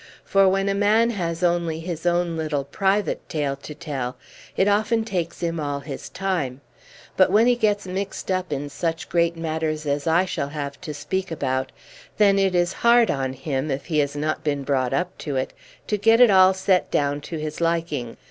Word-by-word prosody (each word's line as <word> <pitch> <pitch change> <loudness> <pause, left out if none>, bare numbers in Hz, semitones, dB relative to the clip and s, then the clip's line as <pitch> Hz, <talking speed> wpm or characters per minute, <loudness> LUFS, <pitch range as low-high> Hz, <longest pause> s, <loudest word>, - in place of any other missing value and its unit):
For 195 -1 +4
when 195 +1 +1
a 200 - +2
man 215 +4 +3
has 170 -5 -3
only 170 -2 +1
his 170 0 -4
own 175 -1 +1
little 155 -3 -1
private 195 +8 -1
tale 145 -3 -1
to 150 +2 -9
tell, 140 -6 -4 0.4
it 190 - +3
often 220 +2 +2
takes 175 -6 -3
him 165 -1 -1
all 145 -1 -3
his 140 -2 -7
time; 170 -10 -2 0.5
but 185 - +5
when 215 +3 +5
he 245 0 +4
gets 210 -4 +1
mixed 190 +1 -4
up 185 -2 -1
in 145 0 -2
such 165 +2 -3
great 170 -1 +1
matters 155 -1 -2
as 145 +1 -1
I 170 +3 +4
shall 155 -6 -3
have 145 -1 -6
to 155 -5 -6
speak 190 +6 -3
about, 130 -4 -2 0.5
then 200 -2 +5
it 190 -2 +2
is 175 +1 +2
hard 235 0 +5
on 135 -2 -2
him, 135 +1 -3
if 135 0 -3
he 155 -4 0
has 145 -1 0
not 155 +1 -2
been 145 -2 -1
brought 130 -2 0
up 180 +1 -1
to 145 -3 -4
it, 130 0 -2 0.3
to 210 - -1
get 225 +3 +5
it 245 -4 +7
all 190 0 +6
set 190 -1 +1
down 145 0 0
to 165 +3 -6
his 155 +1 -5
liking. 165 -8 -1
165 Hz, 200 wpm, -23 LUFS, 145-190 Hz, 0.5 s, it